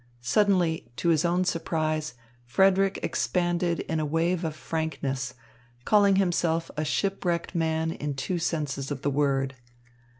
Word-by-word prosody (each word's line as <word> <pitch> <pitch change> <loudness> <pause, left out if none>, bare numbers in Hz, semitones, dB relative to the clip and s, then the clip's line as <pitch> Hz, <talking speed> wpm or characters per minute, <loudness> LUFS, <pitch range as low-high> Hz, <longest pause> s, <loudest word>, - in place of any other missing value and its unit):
Suddenly, 170 - +2
to 170 - 0
his 155 -2 +3
own 175 +1 +2
surprise 155 -3 -1 0.3
Frederick 190 +9 +3
expanded 175 -1 0
in 160 - -2
a - - 0
wave 165 +4 0
of 160 -2 -2
frankness, 135 -5 -3 0.5
calling 200 -2 +5
himself 170 -3 +1
a 155 - -1
shipwrecked 175 +2 -1
man 160 -1 0
in 145 -3 -4
two 155 +7 -2
senses 145 -5 -2
of 140 -2 -5
the 145 - +1
word. 135 -2 0
160 Hz, 135 wpm, -27 LUFS, 145-175 Hz, 0.5 s, calling